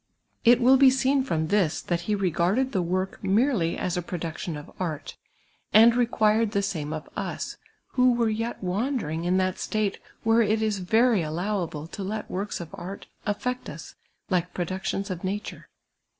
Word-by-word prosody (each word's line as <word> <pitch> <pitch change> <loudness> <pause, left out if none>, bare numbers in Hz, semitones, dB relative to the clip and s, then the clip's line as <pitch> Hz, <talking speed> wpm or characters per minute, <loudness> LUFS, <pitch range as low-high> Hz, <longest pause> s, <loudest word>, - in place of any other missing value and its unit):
It 240 +1 +6
will 255 +2 +6
be 270 0 +7
seen 265 +1 +2
from 160 -11 -1
this 195 -7 +2
that 175 -1 -2
he 210 - +3
re 195 -3 0
garded 200 +12 +1
the 190 - +1
work 185 +2 -2
merely 195 -3 +2
as 180 - -1
a 180 - 0
production 170 -2 -4
of 145 - -10
art, 165 -5 -4 0.6
and 225 +3 +8
rccpiirecl 225 -2 +2
the 200 - +1
same 160 -7 -3
of 155 -1 -5
us, - - -4 0.3
who 250 -1 +4
were 235 -1 +1
yet 225 0 -2
wandering 185 - -1
in 180 +1 +2
that 185 -1 0
state 215 -2 -1 0.2
where 225 +1 +4
it 215 0 +2
is 210 -2 0
very 220 +3 +3
allowable 165 -1 -2
to 170 - -8
let 210 +3 -4
works 200 +3 -3
of 170 -2 -7
art 195 +1 -7 0.2
afiect 250 +5 -2
us - - -9 0.3
like 180 -2 -1
productions 190 +2 -2
of 180 0 -5
nature. 200 +3 -4
195 Hz, 175 wpm, -26 LUFS, 175-225 Hz, 0.6 s, and